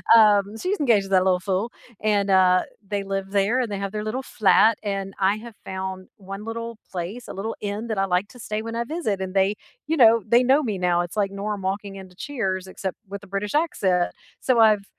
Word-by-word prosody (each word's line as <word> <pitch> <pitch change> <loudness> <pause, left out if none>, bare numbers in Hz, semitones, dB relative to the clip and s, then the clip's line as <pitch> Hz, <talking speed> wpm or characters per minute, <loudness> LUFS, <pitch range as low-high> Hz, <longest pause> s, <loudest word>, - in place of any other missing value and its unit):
Um, 210 -1 +5
she's 370 - -2
engaged 225 -8 +3
to - - -10
that 185 -1 +4
little 185 -1 +3
fool 195 +5 -1 0.3
and, 205 -2 +1
uh, 185 -1 +5 0.3
they 205 -1 -1
live 195 0 -4
there 205 +5 +2
and 235 -4 -1
they 200 - -3
have 200 -1 -3
their 210 0 -3
little 235 +5 -2
flat, 220 -1 +4
and 195 -1 -3
I 195 +2 +3
have 230 0 -10
found 190 0 -5
1 195 +2 -8
little 230 0 -5
place 190 +7 -5
a - - -7
little 215 +4 -4
inn 210 +3 -4
that 220 -3 -2
I 195 - +2
like 180 +2 0
to 245 - -15
stay 215 -1 -3
when 230 +1 -6
I 235 - 0
visit, 235 - -2
and 185 0 -4
they 195 +1 +2 0.3
you 320 0 0
know, 230 -2 +6
they 240 +3 +5
know 270 +4 +4
me 215 -8 -2
now. 175 -1 +2
It's, 175 +4 -6
like, 200 -1 +1
Norm 200 0 -4
walking 195 +1 -3
into 185 -2 -11
Cheers 190 -8 -3
except 190 0 -5
with 200 0 -7
a - - -12
British 200 +5 -3
accent. 190 - +1 0.3
So 255 -3 +2
I've 210 -3 +5
200 Hz, 230 wpm, -24 LUFS, 190-225 Hz, 0.3 s, know